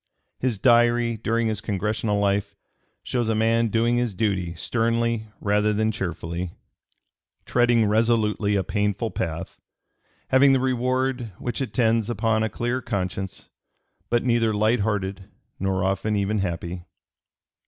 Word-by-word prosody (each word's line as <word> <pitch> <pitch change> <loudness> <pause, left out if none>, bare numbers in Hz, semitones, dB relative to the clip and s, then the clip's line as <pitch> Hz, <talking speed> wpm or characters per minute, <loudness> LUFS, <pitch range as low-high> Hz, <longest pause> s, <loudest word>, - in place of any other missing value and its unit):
His 125 -4 0
Diary 120 0 +3
during 115 +2 0
his 110 -2 -1
Congressional 105 +1 -1
life 100 0 0 0.5
shows 120 -3 -1
a 110 - +1
man 115 +1 +2
doing 115 +2 +1
his 120 -5 -1
duty 95 -5 -1
sternly 115 +3 0
rather 105 +1 +2
than 110 +1 +1
cheerfully, 85 -2 -4 0.9
treading 120 -2 +3
resolutely 105 -1 +2
a 95 - +1
painful 105 +2 -1
path, 85 +1 -4 0.7
having 135 +1 +6
the 135 - +3
reward 130 -2 -1
which 120 +2 -4
attends 115 -4 +1
upon 110 -1 +1
a 110 - 0
clear 120 +5 -2
conscience, 95 -3 -4 0.6
but 120 0 +2
neither 115 -3 +2
light 110 +3 +2
hearted 100 -2 -2 0.3
nor 95 -1 0
often 95 +3 0
even 100 +1 0
happy. 85 -1 -3
110 Hz, 130 wpm, -24 LUFS, 100-120 Hz, 0.9 s, having